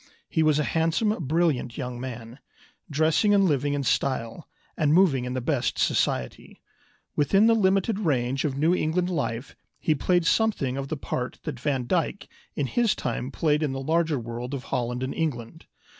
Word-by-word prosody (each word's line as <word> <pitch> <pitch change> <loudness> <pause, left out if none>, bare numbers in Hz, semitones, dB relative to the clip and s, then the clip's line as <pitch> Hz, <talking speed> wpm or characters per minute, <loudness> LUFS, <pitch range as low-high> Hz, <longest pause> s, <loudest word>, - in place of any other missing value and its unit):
He 160 - 0
was 155 -2 +3
a 150 - +2
handsome, 165 +8 +1 0.2
brilliant 150 -7 0
young 125 -2 -4
man, 120 0 -7 0.5
dressing 160 +7 +3
and 195 -1 +4
living 145 -3 +1
in 140 - -1
style, 125 +1 -1 0.3
and 155 -1 +2
moving 155 -9 +4
in 125 +1 -4
the 130 - -1
best 135 0 -1
society. 60 -1 -1 0.6
Within 195 +8 +4
the 230 - +5
limited 195 0 +2
range 135 - 0
of 140 -3 -2
New 160 +5 +3
England 180 +2 0
life 125 -5 -3 0.2
he 155 - +2
played 175 +4 +1
something 165 - +1
of 135 0 -4
the 155 - -3
part 125 -2 -4
that 120 - -5
Van 135 -2 -1
Dyck - - -1 0.3
in 145 - 0
his 230 - +1
time 125 - -3
played 150 +1 +1
in 145 -4 0
the 135 - -3
larger 160 +2 +1
world 120 +3 -5
of 130 - -6
Holland 125 +1 -1
and 130 - -3
England. 150 -2 -4
145 Hz, 175 wpm, -26 LUFS, 125-165 Hz, 0.6 s, the